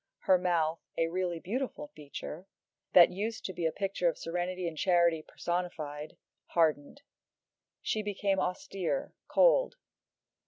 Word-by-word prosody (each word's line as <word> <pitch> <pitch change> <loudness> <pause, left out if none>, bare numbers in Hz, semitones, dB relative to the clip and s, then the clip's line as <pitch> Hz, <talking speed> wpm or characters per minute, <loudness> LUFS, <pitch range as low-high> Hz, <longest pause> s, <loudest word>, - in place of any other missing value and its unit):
Her 185 -1 +4
mouth, 170 -3 +1 0.2
a 165 0 +2
really 180 -1 -1
beautiful 255 - -4
feature, 150 +4 -8 0.5
that 175 -2 +9
used 215 +5 -4
to 190 - -3
be 170 -2 0
a - - 0
picture 195 -2 0
of - - -4
serenity 180 +1 -3
and 165 - -4
charity 170 -1 +3
personified, 155 -4 -4 0.3
hardened. 160 - +1 0.8
She 215 - 0
became 200 -1 0
austere, 195 - -2
cold. - - +4
180 Hz, 125 wpm, -31 LUFS, 165-195 Hz, 0.8 s, that